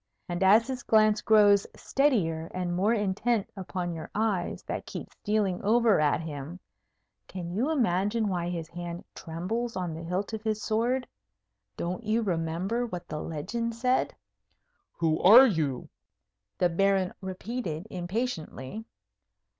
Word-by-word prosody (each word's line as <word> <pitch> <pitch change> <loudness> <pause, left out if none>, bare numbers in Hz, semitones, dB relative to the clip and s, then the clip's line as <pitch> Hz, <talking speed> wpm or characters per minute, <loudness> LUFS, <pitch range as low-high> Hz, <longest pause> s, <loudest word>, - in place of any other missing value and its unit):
And 175 +1 -3
as 210 +4 +6
his 255 0 -4
glance 215 -1 +4
grows 205 -2 +5
steadier 175 - +1
and 180 -1 -2
more 195 +5 +2
intent 205 +2 0
upon 180 -2 -4
your 160 -1 -7
eyes 210 -5 -1
that - - -5
keep - - -7
stealing 205 -4 -1
over 225 -1 +4
at 150 -1 +2
him, 155 +2 -7 0.7
can 175 -2 -6
you 230 - 0
imagine 220 - +1
why 175 -3 -1
his 170 -2 -4
hand 175 0 -6
trembles 215 +9 -4
on 180 -3 -2
the 160 - -6
hilt 180 +6 -3
of 220 - -3
his 215 -1 -1
sword? 240 +4 0 0.7
Don't 180 +6 -3
you 220 +2 +1
remember 180 +5 -1
what 180 -5 -6
the 150 - -4
legend 230 +9 -3
said? 250 +2 +1 0.8
"Who 160 -2 0
are 230 +8 +10
you?" 155 - -1 0.7
the 180 - +3
Baron 190 +1 +1
repeated, 190 -2 -4
impatiently. 185 - -4
190 Hz, 140 wpm, -28 LUFS, 175-225 Hz, 0.8 s, are